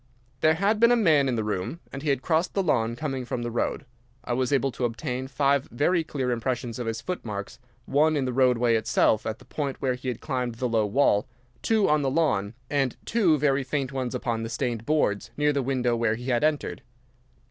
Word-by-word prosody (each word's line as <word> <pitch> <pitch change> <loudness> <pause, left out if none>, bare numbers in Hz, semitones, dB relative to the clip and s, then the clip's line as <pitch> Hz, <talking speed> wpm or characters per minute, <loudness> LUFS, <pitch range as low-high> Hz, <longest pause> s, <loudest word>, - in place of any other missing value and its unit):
There 155 +2 +4
had 200 +5 +1
been 235 +1 +6
a - - +6
man 155 - +4
in 125 - 0
the 110 - -1
room, 105 - -3
and 140 - -5
he 150 - -2
had 135 -2 0
crossed 165 +1 0
the 195 - +2
lawn 115 -8 +1
coming 135 -1 -3
from 120 0 -4
the 120 - -3
road. 120 +4 -2 0.4
I 120 - -2
was 130 +1 0
able 135 -1 +2
to 125 - -5
obtain 125 +2 -2
five 140 0 +1
very 165 +7 +1
clear 135 -5 -2
impressions 120 0 -2
of 120 - -3
his 115 0 -3
footmarks: 110 - -5 0.3
one 155 +3 +3
in 135 - 0
the 125 - -2
roadway 125 -2 +3
itself, 110 -1 +2
at 110 0 -3
the - - -18
point 140 -3 -4
where 130 -1 0
he 125 +1 -7
had 125 -3 -2
climbed 125 -5 -3
the 125 +2 -1
low 110 -3 +1
wall, 105 -2 +2 0.3
two 220 -3 +2
on 150 0 +3
the 135 - +1
lawn, 125 -9 0
and 135 -3 0
two 190 -9 +3
very 140 -1 +2
faint 135 0 -2
ones 130 -3 -3
upon 115 -1 -2
the 115 - -4
stained 115 -2 -3
boards 115 -9 +1
near 150 0 +2
the 140 - 0
window 125 -2 0
where 115 -2 +1
he 125 +3 -6
had 120 +2 +1
entered. 155 -1 0
130 Hz, 225 wpm, -26 LUFS, 120-150 Hz, 0.4 s, been